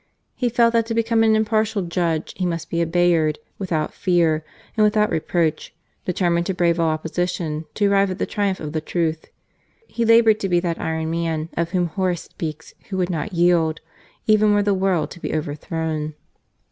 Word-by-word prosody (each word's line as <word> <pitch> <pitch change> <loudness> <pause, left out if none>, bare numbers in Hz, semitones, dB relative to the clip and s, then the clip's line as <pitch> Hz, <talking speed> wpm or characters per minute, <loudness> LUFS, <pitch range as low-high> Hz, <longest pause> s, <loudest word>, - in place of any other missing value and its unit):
He 245 - -1
felt 235 0 +3
that 230 -1 +2
to 225 - -2
become 230 0 +2
a 225 - +4
really 220 - +4
impartial 215 -1 +1
judge, 170 -2 -1
he 185 - -3
must 170 -2 -3
be 170 - 0
a 170 - +1
Bayard 165 -3 +2 0.2
without 165 -6 -2
fear 165 -4 +2 0.3
and 215 - +3
without 210 0 +3
reproach, 160 -1 -1 0.3
determined 175 -1 +1
to 190 - -1
brave 170 -2 +2
all 165 -1 +3
opposition 160 0 -2
to 205 - +1
arrive 200 -1 +3
at 185 - -4
the - - -1
triumph 200 -2 -1
of 150 -1 -6
the 155 - -1
truth. 160 -1 -2 0.6
He 235 - -3
laboured 230 -1 +5
to 195 - -2
be 175 -1 +3
that 170 -1 -2
iron 160 0 -2
man 165 -1 -2
of 170 0 -1
whom 180 0 +1
Horace 175 0 -1
speaks 160 -1 -7 0.2
who 190 - -3
would 185 0 0
not 165 +4 -3
yield 170 -2 +2 0.5
even 215 -1 +4
were 205 - +3
the 205 0 +2
world 185 -4 0
to 175 - -10
be 155 - -3
overthrown. 155 0 -3
175 Hz, 195 wpm, -22 LUFS, 160-205 Hz, 0.6 s, laboured